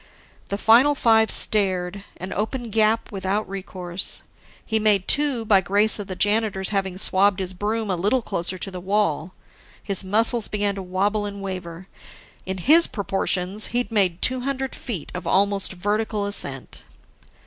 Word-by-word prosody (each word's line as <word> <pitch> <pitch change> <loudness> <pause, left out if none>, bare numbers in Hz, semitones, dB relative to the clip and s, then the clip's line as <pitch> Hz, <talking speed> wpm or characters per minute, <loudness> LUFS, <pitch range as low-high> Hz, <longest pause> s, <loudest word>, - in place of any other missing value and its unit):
The 200 - -2
final 245 +8 +4
five 225 -4 +3
stared, 190 -2 +1
an 185 +2 -7
open 230 +2 -4
gap 220 +1 +1
without 195 +1 -3
recourse. 185 -1 -3 0.4
He 220 -1 0
made 210 -3 +2
two 275 -6 +3
by 200 -3 +4
grace 205 +4 +1
of 205 - -6
the 185 - -6
janitor's 205 -1 0
having 195 -3 -2
swabbed 195 0 +3
his 190 -1 -3
broom 210 +2 -3
a - - 0
little 210 +8 0
closer 185 -2 -3
to 195 +2 -5
the 185 - -7
wall. 185 -3 -1 0.5
His 200 -2 -1
muscles 220 +3 +2
began 205 -1 -1
to 195 - -7
wobble 200 +3 -1
and 200 0 -8
waver: 185 -2 -7 0.6
in 190 0 -3
his 310 - +5
proportions, 195 0 +1
he'd 245 -1 -1
made 190 -5 +1
two 255 0 +2
hundred 265 0 -4
feet 190 - -6
of 180 - -7
almost 200 0 +1
vertical 205 +2 -2
ascent. 140 -10 -2
200 Hz, 160 wpm, -22 LUFS, 185-220 Hz, 0.6 s, his